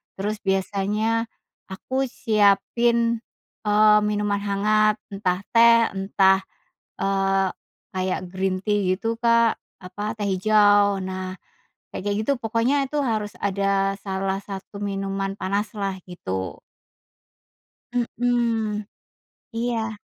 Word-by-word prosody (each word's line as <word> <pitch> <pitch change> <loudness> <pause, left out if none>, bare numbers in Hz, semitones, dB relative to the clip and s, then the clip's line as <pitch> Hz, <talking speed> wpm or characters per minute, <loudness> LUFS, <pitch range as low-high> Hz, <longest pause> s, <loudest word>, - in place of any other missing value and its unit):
Terus, 210 +2 -2
biasanya 205 +4 0 0.4
aku 260 +8 -3
siapin, 230 +1 +2 0.5
eee, 210 0 +5
minuman 205 -1 0
hangat, 210 +1 +2
entah 190 -2 -1
teh, 230 0 +6 0.2
entah, 190 0 +3 0.6
eee, 195 -1 +1 0.5
kayak 185 0 -1
green 185 0 -2
tea, 205 +1 +1 0.2
gitu 225 +3 -3
Kak, 230 -1 +3 0.2
apa, 205 +4 -5
teh 205 - -2
hijau. 205 0 +4
Nah, 185 0 -5 0.6
kayak-kayak 205 +1 -2
gitu, 280 - +2
pokoknya, 235 +5 +1
itu 295 - -2
harus 215 -3 -1
ada 195 0 +1
salah 195 0 -2
satu 200 +1 -8
minuman 195 -1 -3
panaslah, 200 -1 -2
gitu. 95 - -5 1.3
Mhm, 235 -3 0 0.7
iya. 225 -2 -2
205 Hz, 100 wpm, -23 LUFS, 195-225 Hz, 1.3 s, teh